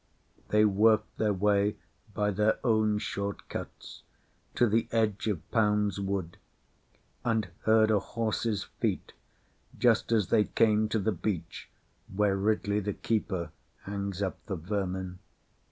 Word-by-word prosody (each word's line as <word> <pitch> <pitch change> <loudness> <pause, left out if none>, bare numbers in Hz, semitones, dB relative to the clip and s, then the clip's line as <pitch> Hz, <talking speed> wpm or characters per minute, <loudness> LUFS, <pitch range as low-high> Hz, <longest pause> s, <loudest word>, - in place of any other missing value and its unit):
They 105 0 +4
worked 110 +1 +3
their 105 -1 +2
way 100 +1 +2 0.4
by 105 -1 +1
their 105 +2 +2
own 110 -2 +3
short 100 -1 -4
cuts - - -8 0.5
to 120 - +4
the 115 +2 +1
edge 110 -2 0
of 90 -8 -2
PoundŌĆÖs 105 -3 +2
Wood, 95 -3 -3 0.9
and 110 -5 0 0.2
heard 110 0 +5
a 105 - +4
horseŌĆÖs 110 -2 -2
feet - - -1 0.6
just 115 -2 +3
as 110 -4 +2
they 105 - +4
came 110 -1 +2
to 110 - 0
the 110 +1 +1
beech 90 -2 -4 0.4
where 100 0 +2
Ridley 105 +1 +1
the 105 0 -2
keeper 95 -8 -2 0.3
hangs 100 -1 -3
up 95 - -4
the 100 - -2
vermin. 95 0 -3
105 Hz, 135 wpm, -29 LUFS, 100-110 Hz, 0.9 s, heard